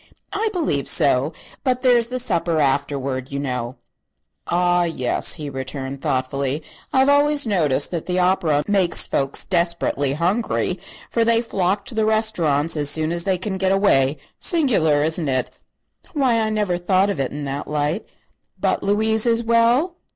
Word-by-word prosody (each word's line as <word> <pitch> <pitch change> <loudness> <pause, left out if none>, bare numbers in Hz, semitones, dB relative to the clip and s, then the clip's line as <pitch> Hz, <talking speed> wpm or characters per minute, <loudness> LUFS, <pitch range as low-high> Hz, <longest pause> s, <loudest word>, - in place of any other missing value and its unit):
"I 430 +2 0
believe 300 - -1
so; 140 +2 +2 0.3
but 255 -1 0
there 250 -1 +5
is 235 -1 +2
the 250 +1 -3
supper, 170 -9 0
afterward, 135 -2 -1
you 140 - -3
know." 125 -3 -3 0.7
"Ah, 175 0 +2
yes," 145 -8 0
he 150 - -6
returned, 135 0 -5
thoughtfully. 135 +3 -1 0.3
"I've 265 0 +3
always 285 0 +4
noticed 155 - +1
that 170 -3 -4
the 180 0 -1
opera 180 -5 +2
makes 195 -4 +2
folks 135 0 -1
desperately 170 -6 0
hungry, 185 +3 -1 0.3
for 230 - +2
they 230 0 +3
flock 200 -3 -1
to 265 - -6
the 220 -1 0
restaurants 175 -9 +1
as 145 -2 0
soon 155 +2 0
as 170 0 -2
they 190 -1 +1
can 190 +1 -4
get 190 0 +1
away. 155 -8 +3 0.2
Singular, 205 - +2
isn't 160 -1 0
it?" 130 -1 -1 0.6
"Why, 260 -6 +2
I 220 -1 0
never 205 -5 -1
thought 190 +3 +2
of 175 - -5
it 135 - -1
in 145 0 -5
that 140 +1 -4
light." 150 +6 -2 0.5
"But - - 0
Louise 220 +3 +1
is 230 0 +2
well?" 235 +9 +2
175 Hz, 165 wpm, -21 LUFS, 145-220 Hz, 0.7 s, there